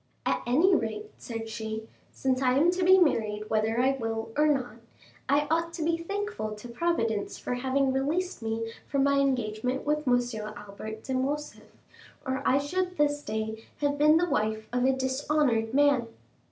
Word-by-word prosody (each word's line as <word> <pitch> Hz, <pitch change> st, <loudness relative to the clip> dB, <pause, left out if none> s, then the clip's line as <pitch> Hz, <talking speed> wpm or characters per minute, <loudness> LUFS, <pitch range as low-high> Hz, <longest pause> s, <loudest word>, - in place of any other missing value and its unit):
"At -, -, +1 dB
any 320 Hz, +11 st, +4 dB
rate," 425 Hz, +3 st, -1 dB
said 225 Hz, -1 st, -6 dB
she, 220 Hz, 0 st, -5 dB, 0.2 s
"since 260 Hz, -1 st, 0 dB
I 255 Hz, 0 st, +3 dB
am 330 Hz, +5 st, +5 dB
to 365 Hz, 0 st, -1 dB
be 375 Hz, +1 st, +7 dB
married 215 Hz, -, +1 dB
whether 220 Hz, +2 st, +1 dB
I 260 Hz, +2 st, +4 dB
will 225 Hz, -1 st, -3 dB
or 300 Hz, +1 st, +4 dB
not, 255 Hz, -6 st, 0 dB, 0.5 s
I 290 Hz, +2 st, +3 dB
ought 335 Hz, +1 st, +1 dB
to 330 Hz, -, -3 dB
be 330 Hz, +1 st, +2 dB
thankful 395 Hz, -, -4 dB
to 210 Hz, +3 st, -10 dB
Providence 235 Hz, -6 st, -1 dB
for -, -, -4 dB
having 265 Hz, +2 st, +1 dB
released 310 Hz, +5 st, -1 dB
me 225 Hz, 0 st, -3 dB, 0.2 s
from 275 Hz, -1 st, +1 dB
my 280 Hz, 0 st, +3 dB
engagement 250 Hz, -1 st, 0 dB
with 300 Hz, 0 st, 0 dB
M. 245 Hz, 0 st, +5 dB, 0.4 s
Albert 215 Hz, +2 st, -8 dB
de 265 Hz, -, -4 dB
Morcerf, 285 Hz, +3 st, -3 dB, 0.6 s
or 265 Hz, 0 st, -1 dB
I 265 Hz, -, +4 dB
should 360 Hz, +6 st, -2 dB
this 290 Hz, 0 st, +2 dB
day 220 Hz, -1 st, -4 dB, 0.2 s
have 285 Hz, 0 st, 0 dB
been 305 Hz, +2 st, +6 dB
the 350 Hz, +1 st, +2 dB
wife 220 Hz, -7 st, -1 dB
of 250 Hz, 0 st, +2 dB
a 265 Hz, -, +5 dB
dishonored 260 Hz, -3 st, +1 dB
man." 280 Hz, -3 st, +3 dB
265 Hz, 175 wpm, -28 LUFS, 225-300 Hz, 0.6 s, be